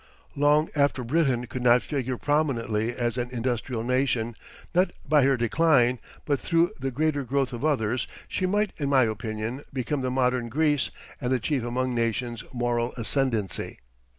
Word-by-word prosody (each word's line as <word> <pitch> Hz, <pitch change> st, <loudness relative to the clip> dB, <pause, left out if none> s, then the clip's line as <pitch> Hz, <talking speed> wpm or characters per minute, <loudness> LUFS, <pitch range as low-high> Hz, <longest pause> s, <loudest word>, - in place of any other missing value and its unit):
Long 150 Hz, +2 st, +3 dB
after 140 Hz, -3 st, +2 dB
Britain 130 Hz, -2 st, +1 dB
could 125 Hz, +1 st, -6 dB
not 125 Hz, 0 st, +5 dB
figure 130 Hz, -4 st, -2 dB
prominently 120 Hz, -7 st, 0 dB
as 120 Hz, 0 st, -2 dB
an 120 Hz, 0 st, -2 dB
industrial 120 Hz, -1 st, -2 dB
nation, 125 Hz, -2 st, +1 dB, 0.4 s
not 180 Hz, +2 st, +3 dB, 0.2 s
by 150 Hz, +1 st, +5 dB
her 135 Hz, 0 st, +3 dB
decline, 125 Hz, 0 st, +3 dB, 0.3 s
but 145 Hz, -2 st, +1 dB
through 170 Hz, 0 st, +2 dB
the 135 Hz, +1 st, -1 dB
greater 145 Hz, +2 st, 0 dB
growth 135 Hz, 0 st, 0 dB
of 120 Hz, -, -5 dB
others, 125 Hz, -6 st, +1 dB, 0.2 s
she 185 Hz, -, -1 dB
might 205 Hz, +1 st, +1 dB
in 140 Hz, -3 st, -1 dB
my 135 Hz, -2 st, +5 dB
opinion 110 Hz, +3 st, -3 dB
become 135 Hz, +2 st, -2 dB
the 130 Hz, -, -1 dB
modern 125 Hz, -2 st, +1 dB
Greece 150 Hz, +2 st, +1 dB, 0.3 s
and 125 Hz, +1 st, 0 dB
achieve 130 Hz, +1 st, 0 dB
among 125 Hz, +1 st, -1 dB
nations 115 Hz, 0 st, -1 dB
moral 120 Hz, -1 st, -1 dB
ascendancy. 115 Hz, -4 st, -1 dB
125 Hz, 155 wpm, -26 LUFS, 120-145 Hz, 0.4 s, not